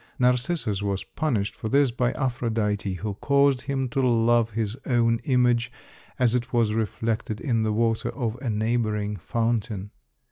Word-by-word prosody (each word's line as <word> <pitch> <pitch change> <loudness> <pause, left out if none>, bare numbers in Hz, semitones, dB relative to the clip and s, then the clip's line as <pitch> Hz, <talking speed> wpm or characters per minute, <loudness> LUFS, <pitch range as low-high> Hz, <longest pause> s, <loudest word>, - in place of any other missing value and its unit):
Narcissus 125 - +1
was 100 -1 -2
punished 115 -10 -2
for 110 - -5
this 140 0 +3
by 125 0 0
Aphrodite, 110 -6 -1
who 105 +3 -4
caused 140 +3 +2
him 135 -2 -2
to 135 - 0
love 120 -2 +3
his 110 -1 -2
own 115 -2 +2
image 125 -2 +2 0.5
as 120 -2 +3
it 125 -1 -1
was 115 -3 +2
reflected 110 0 -2
in 115 -5 0
the 110 -1 +1
water 115 +1 +1
of 115 -5 -3
a 130 - -2
neighboring 110 -1 0
fountain. 110 -1 -2
115 Hz, 150 wpm, -25 LUFS, 110-125 Hz, 0.5 s, this